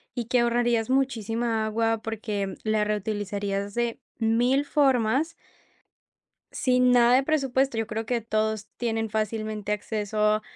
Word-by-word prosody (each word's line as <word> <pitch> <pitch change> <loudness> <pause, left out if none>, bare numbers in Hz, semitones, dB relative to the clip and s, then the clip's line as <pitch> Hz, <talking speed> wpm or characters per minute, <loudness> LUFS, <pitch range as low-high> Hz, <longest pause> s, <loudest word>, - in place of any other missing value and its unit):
y 240 -2 -2
que 245 +2 +2
ahorrarías 235 -1 +1
muchísima 230 -3 0
agua, 225 +1 0
porque 210 -3 -3
la 215 -1 +1
reutilizarías 205 -1 -2
de 235 -1 -1 0.2
mil 245 +5 +2
formas. 275 +2 +2 1.2
Sin 250 -1 +3
nada 240 0 +5
de 265 - +5
presupuesto. 270 -4 +1
Yo 225 - -1
creo 220 +1 -3
que 240 -1 0
todos 215 -1 -1
tienen 225 -2 -1
fácilmente 215 -1 -2
acceso 210 0 0
225 Hz, 125 wpm, -26 LUFS, 215-245 Hz, 1.2 s, nada